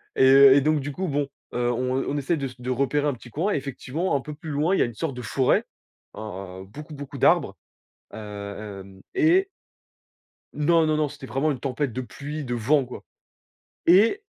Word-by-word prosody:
et - - +4
et 135 +1 +8
donc 155 +1 +2
du 145 +1 -4
coup, 185 +5 -3
bon, 145 -1 0 0.3
heu, 120 0 +1
on 130 +2 0
on 145 - -1
essaie 150 +4 0
de 140 - -3
s 130 0 -13
de 125 +1 -5
repérer 140 +3 +1
un 145 - +1
petit 120 0 -12
coin. 175 - -1
Effectivement, 140 +5 -2
un 135 - 0
peu 150 - -7
plus 155 +1 -9
loin, 155 +6 +1
il - - 0
y - - +4
a - - +4
une 120 - -6
sorte 155 0 -3
de 125 - -6
forêt, 125 +3 +1 0.5
hein, 95 -3 -7
beaucoup, 150 +8 -10
beaucoup 140 0 -8
d'arbres, - - +3 0.6
heu, - - -6 0.7
hem, 95 -1 -16
et 375 +2 +4 1.1
Non, 160 +2 +3
non, 155 -1 +1
non, 150 -2 +1
c'était 140 -2 -10
vraiment 140 +4 0
une 130 - -4
tempête 135 -1 -2
de 130 - -3
pluie, 145 +4 -6
de 120 -1 -2
vent, 135 +4 +2
quoi, 125 - -9 0.8
et 215 - +5
140 Hz, 205 wpm, -25 LUFS, 125-155 Hz, 1.1 s, et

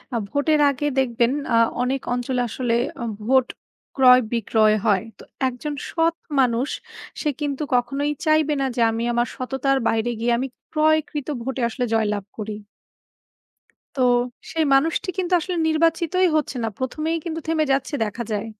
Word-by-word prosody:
আ - - +2
ভোটের 300 +4 +2
আগে 280 +1 -2
আ - - -7
দেখবেন 240 -2 +2 0.2
আ - - +5 0.3
অনেক 265 +1 -1
অঞ্চলে 250 +1 -1
আসলে 235 0 -1 0.3
অ - - -2 0.2
ভোট 260 0 +4 0.5
ক্রয় 255 -2 +7
বিক্রয় 215 -1 +3
হয়। 205 -3 +3
তো - - -13 0.2
একজন 260 +4 -4 0.2
সৎ 330 0 +1 0.2
মানুষ 250 +1 +2 0.5
সে 300 - 0
কিন্তু, 290 0 -2
কখনোই 275 +4 0
চাইবে 310 -1 +3
না - - +1
যে, 240 - 0
আমি 225 +1 -2
আমার 240 +1 +1
সততার 270 +1 0
বাইরে 225 +1 +1
গিয়ে, 235 +1 +1
আমি 260 +3 -2 0.2
ক্রয়কৃত 310 -2 +1 0.2
ভোটে 265 +1 -3
আসলে 245 +2 -2
জয়লাভ 210 -2 +1 0.2
করি। 215 0 -4 1.4
তো, - - -2 0.5
সেই 320 -1 +1
মানুষটি 315 +7 +1
কিন্তু 365 -1 -1
আসলে 360 +2 -3
নির্বাচিতই 330 +3 +2
হচ্ছে 300 -3 -1
না। - - +1
১ম 260 +4 -4
এই 330 - 0
কিন্তু 325 -1 -4
থেমে 320 -1 +2
যাচ্ছে, 270 +2 -1
দেখা 220 +3 -4
যায়। 210 +1 -2
265 Hz, 160 wpm, -22 LUFS, 240-310 Hz, 1.4 s, ক্রয়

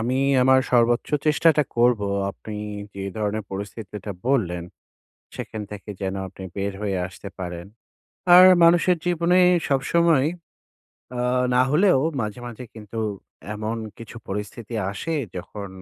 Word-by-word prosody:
আমি 125 +3 0 0.2
আমার 130 +1 +5
সর্বোচ্চ 120 0 +3 0.2
চেষ্টাটা 155 0 +4
করবো 120 -4 +3 0.2
আপনি 105 +2 -9 0.4
যে 100 - -6 0.2
ধরনের 105 0 -2
পরিস্থিতিটা 105 0 -6 0.2
বললেন, 90 -11 +1 0.7
সেখান 110 -1 -6
থেকে 105 0 -8
যেন 95 0 -2
আপনি 95 - -12
বের 100 0 -2
হয়ে 100 -3 -1
আসতে 95 +2 -10
পারেন। 90 -1 -6 0.7
আর 180 - +10 0.2
মানুষের 175 +1 +5
জীবনে 175 +1 +2 0.3
সবসময় 150 +1 +3 0.9
অ্যা 125 0 -2 0.3
না 125 - +5
হলেও 180 -1 +4 0.2
মাঝে, 105 +2 -4
মাঝে 120 +1 -8
কিন্তু 110 0 -8 0.6
এমন 110 +2 -3 0.2
কিছু 115 0 -10
পরিস্থিতি 105 +3 -5 0.2
আসে, 165 +11 -3 0.2
যখন 100 +3 -7
115 Hz, 125 wpm, -23 LUFS, 100-135 Hz, 0.9 s, আর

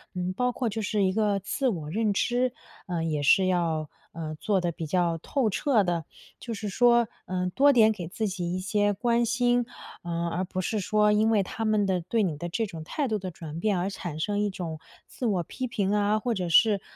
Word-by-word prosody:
嗯， 180 0 -2
包 250 +5 0
括 245 -3 -1
就 220 +1 -3
是 205 -1 0
一 185 - +3
个 205 -1 +1
自 230 +8 -1
我 165 -10 -2
认 215 +2 +1
知， 245 +4 +1 0.3
呃， 170 -2 -2
也 155 -3 -1
是 190 +6 +5
要， 165 -4 0 0.2
呃， 155 -2 -5
做 200 -3 +1
得 175 -1 -1
比 160 0 -6
较 170 +1 +1
透 250 - 0
彻 235 0 +2
的。 170 -4 -1 0.3
就 235 - -5
是 210 -1 -5
说， 235 +3 +4 0.2
嗯， 180 0 -2
多 280 +8 +5
点 220 -2 +6
给 180 -6 -5
自 215 +5 -2
己 180 -3 -3
一 - - -2
些 205 +2 +1
关 235 +3 +1
心， 245 0 +2 0.4
嗯， 170 0 -2
而 180 +3 -1
不 185 +1 -5
是 215 +3 -1
说 210 +2 +3
因 215 +2 +3
为 210 -3 +3
他 225 +4 -4
们 215 -2 +2
的 185 -2 0
对 215 +6 0
你 160 -6 -1
的 175 +2 -5
这 225 +6 -1
种 165 -6 -8
态 280 - -2
度 220 -3 0
的 185 -1 -5
转 160 -1 -8
变 205 +1 +1
而 180 +2 -1
产 175 -5 -6
生 205 +5 -1
一 205 0 +1
种 165 -5 -5 0.3
自 250 - -6
我 190 -6 +1
批 255 +9 -5
评 200 -4 -1
啊， 210 +1 +2
或 240 +2 -1
者 180 -5 -2
是， 205 +3 +5
200 Hz, 245 characters per minute, -27 LUFS, 175-225 Hz, 0.4 s, 点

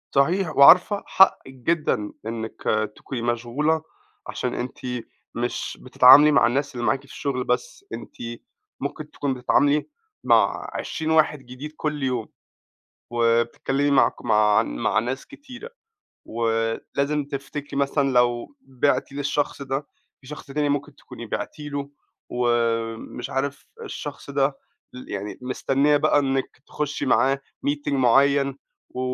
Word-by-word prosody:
صحيح 170 +5 +2
وعارفة 180 +8 +7
حقِك 190 -8 +3
جدًا 130 -6 -1
إنِك 110 0 -5 0.3
تكوني 130 -4 -6
مشغولة، 120 +7 0 0.5
عشان 125 - -3
أنتِ 125 +1 -5 0.6
مش 120 +1 -3
بتتعاملي 130 +4 +7
مع 140 - +5
الناس 135 +3 -1
اللي 120 -1 -3
معاكِ 135 +5 +2
في 140 - -19
الشغل 135 -2 -3
بس؛ 340 - -2
أنتِ - - -8 0.6
ممكن - - -5
تكوني 140 -2 -2
بتتعاملي 145 +4 +2 0.4
مع - - +2
20 160 0 -3
واحد 155 -2 +3
جديد 130 +3 -9
كل 150 -2 -2
يوم. 125 -4 -1 0.8
وبتتكلمي 120 +4 +1
مع 140 - +5
ك - - -16
مع 105 -1 +4
مع - - 0
ناس 125 +4 -4
كتيرة 285 - -11 0.6
ولازم 115 +6 -1
تفتكري 140 0 -6
مثلًا 140 0 +1
لو 125 - +1
بِعتِ 135 - 0
للشخص 145 0 -2
ده، 135 +1 -3 0.3
في 135 - -19
شخص 150 +2 -9
تاني 145 +1 -1
ممكن 145 0 -2
تكوني 120 -2 -10
بِعتِ 115 - -5
له 145 -1 -5 0.4
ومش 115 -2 -1
عارف 140 +1 -3 0.2
الشخص 145 -1 -7
ده 135 0 +1 0.4
ل 125 - -10
يعني 100 +1 -5
مستنية 135 +3 +1
بقى 145 0 +3
إنِك 135 -2 -1
تخشي 150 -1 -3
معاه 135 +1 +3 0.3
meeting 145 0 -1
معين 140 +1 +3 0.3
و 125 - -6
135 Hz, 130 wpm, -24 LUFS, 120-145 Hz, 0.8 s, وعارفة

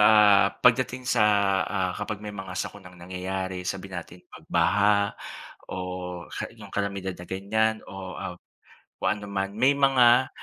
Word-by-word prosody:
ah, 105 -2 +6
Pagdating 125 +1 +2
sa, 115 -4 +4 0.4
ah, 95 -3 -1
kapag 105 0 -4
may 105 -1 -7
mga 95 -2 -7
sakunang 90 -3 -6
nangyayari, 95 +1 -4
sabihin 95 +1 -4
nating 90 +1 -15
pagbaha 100 +2 +2 0.6
o - - -4 0.5
ha - - -4
'yung - - -13
kalamidad 100 -2 -2
na 90 - -10
ganyan. 110 +3 0
Oh, 95 -1 -7
ah, 90 - -5 0.6
kung 95 - +1
ano 105 - -8
man. 100 0 -2
May 130 +5 +5
mga, 130 -2 +5
100 Hz, 145 wpm, -26 LUFS, 95-110 Hz, 0.6 s, ah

